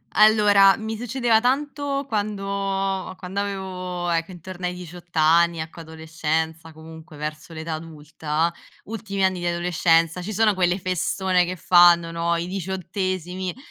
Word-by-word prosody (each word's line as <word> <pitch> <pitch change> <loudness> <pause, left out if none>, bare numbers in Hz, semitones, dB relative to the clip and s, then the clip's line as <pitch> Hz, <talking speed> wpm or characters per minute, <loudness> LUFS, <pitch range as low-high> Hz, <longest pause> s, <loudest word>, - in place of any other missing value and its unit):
Allora, 210 -2 +6
mi 220 0 -4
succedeva 240 -1 +1
tanto 280 +1 -1
quando 195 -3 -2
quando 190 +2 -5
avevo, 185 -3 -4
ecco, 165 +1 0
intorno 180 +1 -6
ai 180 - -4
18 175 -1 -11
anni, 165 +2 +4
ecco, 160 +1 -7
adolescenza, 160 0 -3
comunque 160 -1 -13
verso 150 +2 -6
l'età 160 +1 -5
adulta; 155 +1 -3 0.3
ultimi 200 -3 -4
anni 190 -1 +1
di 175 - -2
adolescenza 170 0 +2
ci 205 +4 -5
sono 215 0 +3
quelle 180 0 +1
festone 185 0 0
che 185 +1 -4
fanno, 175 -1 +5
no, 170 0 0
i 170 +1 -2
diciottesimi, 185 0 -3
180 Hz, 135 wpm, -23 LUFS, 165-195 Hz, 0.3 s, Allora